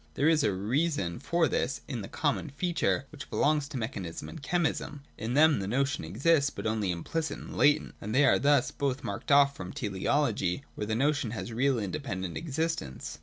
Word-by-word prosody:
There 145 - +2
is 160 -2 +4
a 105 - +3
reason 105 - -1
for 170 -1 +2
this 135 +1 -1
in 125 -6 -4
the 95 - -6
common 150 +1 -1
feature 155 -2 0
which 150 -2 -9
belongs 150 -1 +2
to 140 -2 -6
mechanism 100 -8 -5
and 160 - -9
chemism. 150 -2 -1
In 115 +3 -3
them 155 -2 +5
the 95 - -3
notion 135 +2 0
exists, 140 - +2
but - - -8
only 110 -3 0
implicit 155 - -2
and - - -9
latent, 150 +1 +3
and 105 +3 -3
they 140 +2 +6
are - - +5
thus 140 -2 +3
both 140 -1 -2
marked 100 +4 -4
off 140 0 +6
from 90 -5 -7
teleology 105 +1 0
where 105 - -4
the 110 - 0
notion 135 -1 +1
has 115 - -5
real 130 +2 +2
independent 95 - -3
existence. 160 - -3
140 Hz, 190 wpm, -29 LUFS, 105-150 Hz, -, they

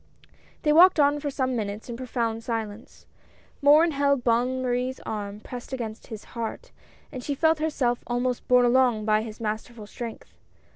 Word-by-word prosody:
They 300 -2 +3
walked 355 +1 +7
on 290 0 +4
for 290 0 -3
some 260 -2 -1
minutes 210 -1 -4
in 240 - -5
profound 230 -2 -3
silence. 225 -2 -5 0.6
Morin 305 +4 +6
held 280 -2 +1
Bonne 245 +2 +1
Marie's 255 +1 -1
arm 205 -1 -5
pressed 250 +3 -8
against 225 -4 -5
his 220 -2 -8
heart, 235 - -5 0.4
and 255 -3 -7
she 285 - -2
felt 320 +2 +2
herself 275 -6 0
almost 245 0 -2
borne 250 -1 +5
along 245 -3 +3
by 215 0 +3
his 220 -1 -8
masterful 220 0 -5
strength. 230 +2 -8
245 Hz, 160 wpm, -26 LUFS, 225-275 Hz, 0.6 s, walked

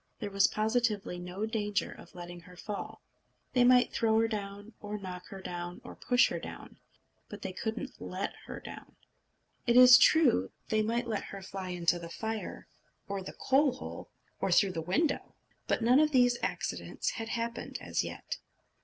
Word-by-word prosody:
There 205 - -4
was 195 0 +5
positively 215 -4 0
no 180 +4 -4
danger 210 -2 -1
of - - -14
letting 175 0 -8
her 180 +1 -15
fall. 205 +2 -6 0.5
They 250 - +5
might 250 0 +5
throw 220 -1 +3
her 225 - +3
down, 205 0 -5
or 210 0 -5
knock 180 -2 -7
her 195 -1 -9
down, 175 -1 -5
or - - -9
push 245 0 +3
her - - -3
down, - - -10 0.5
but - - -9
they 185 - -4
couldn't 220 +4 -5
let - - -3
her - - -6
down. - - -11 0.7
It 240 +1 +5
is 250 -1 +10
true, 265 - +5 0.2
they 215 0 +2
might 230 +3 0
let 220 -3 -2
her 195 -1 -8
fly 190 -1 -6
into 175 -1 +1
the 170 -1 -8
fire 220 +4 -5 0.4
or 200 -1 -3
the 185 - -7
coal 275 0 +4
hole, 255 - -8 0.3
or - - 0
through 200 -2 +5
the 165 - -2
window; 275 - 0 0.3
but - - +1
none 250 +4 +6
of 305 0 +4
these 245 -3 +4
accidents - - -2
had 225 - -5
happened 235 0 -3
as - - -1
yet. - - -5
215 Hz, 180 wpm, -31 LUFS, 185-240 Hz, 0.7 s, is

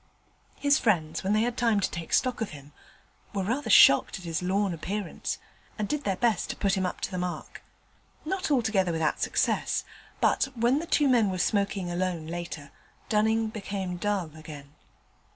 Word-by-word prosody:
His 285 -1 +3
friends, 165 -9 +1
when 195 +2 +1
they 215 +1 +3
had 240 0 -1
time 230 -4 +2
to 195 - -1
take 170 -2 -6
stock 255 -2 +1
of 225 - -1
him, 145 0 -12 0.6
were 195 - 0
rather 240 +6 -2
shocked 140 -8 +7
at 185 - -11
his 165 0 -2
lorn 190 +1 0
appearance, 190 +3 -4 0.4
and 210 -2 -2
did 295 +3 -2
their 195 - +1
best 225 -2 +1
to - - -3
keep 200 - 0
him 190 -1 +1
up - - -6
to - - -3
the 185 - -3
mark. 180 0 -5 0.6
Not 375 +2 -2
altogether 220 -9 +2
without 160 -2 0
success: - - 0 0.4
but, - - +3
when 240 +4 +2
the 335 - -6
two 295 -2 +3
men 235 -6 +4
were 185 - -2
smoking 195 -1 0
alone 175 -2 -2
later, 165 -3 -6 0.4
Dunning 220 +1 +2
became 195 -4 -4
dull 190 -3 -1
again. 150 -2 -11
195 Hz, 180 wpm, -27 LUFS, 175-225 Hz, 0.6 s, shocked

